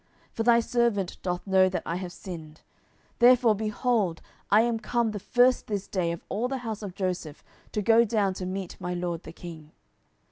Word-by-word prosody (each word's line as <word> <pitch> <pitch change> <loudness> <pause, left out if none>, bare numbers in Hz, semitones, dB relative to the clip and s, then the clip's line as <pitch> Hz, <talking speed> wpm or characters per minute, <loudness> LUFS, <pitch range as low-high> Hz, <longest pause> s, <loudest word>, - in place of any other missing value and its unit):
10:019:020 - - -40
For - - -3
thy 235 0 +5
servant 230 -5 0
doth 180 -1 -3
know 190 -1 +4
that 185 - -3
I 170 - -2
have 180 -1 -5
sinned: 165 -5 -9 0.6
therefore, 245 -2 +6
behold, 215 -4 0 0.3
I 210 +2 +6
am 230 -1 0
come 235 0 0
the 210 - -5
first 245 +5 +3
this 205 -2 -3
day 175 -4 -1
of 170 - -6
all 230 +4 -1
the 265 +1 -2
house 220 -2 -4
of 195 -4 -7
Joseph 180 -5 -3 0.3
to 210 - -2
go 230 +2 +6
down 210 -4 +1
to 185 -1 -5
meet 185 -1 -5
my 180 0 -3
lord 175 -1 -3
the 160 - -10
king. 160 -3 -10
200 Hz, 200 wpm, -27 LUFS, 180-230 Hz, 0.6 s, therefore